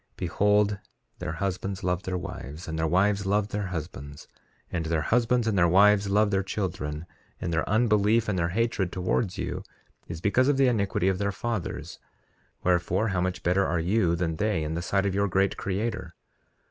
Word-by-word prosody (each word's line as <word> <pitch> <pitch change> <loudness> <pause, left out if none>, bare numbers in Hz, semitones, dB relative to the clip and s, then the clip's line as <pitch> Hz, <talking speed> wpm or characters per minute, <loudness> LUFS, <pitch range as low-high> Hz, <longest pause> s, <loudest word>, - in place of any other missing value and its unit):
3:7 - - -45
Behold, 105 +3 +2 0.4
their 85 -1 -3
husbands 95 +2 -3
love 90 0 0
their 95 -1 -3
wives, 80 -1 -7
and 80 0 -3
their 80 - +1
wives 100 +3 +2
love 105 +1 +1
their 105 -1 -2
husbands; 75 -5 -7 0.4
and 80 -2 -2
their 80 -2 0
husbands 120 +5 +2
and 110 -2 +1
their 90 -2 +4
wives 100 +3 +5
love 105 +1 +3
their 95 -1 +2
children; 90 -6 -3 0.3
and 85 -2 -3
their 80 - 0
unbelief 110 0 +3
and 100 -3 0
their 85 0 +1
hatred 100 -2 0
towards 95 +2 -1
you - - -3 0.5
is 80 - -6
because 105 +8 +2
of 145 -1 +3
the 135 - +4
iniquity 100 -6 +1
of 95 -1 +1
their 100 0 0
fathers; 115 0 -4 0.6
wherefore, 90 +4 +1
how 90 -2 0
much 90 +1 -2
better 90 +3 +3
are 85 -2 0
you 90 0 +2
than 85 -2 -2
they, 105 -4 0
in 75 +1 -3
the 85 - -2
sight 95 +2 0
of 100 - 0
your 100 +1 +1
great 95 +1 +1
Creator? 100 -3 -3
95 Hz, 190 wpm, -27 LUFS, 85-105 Hz, 0.6 s, wives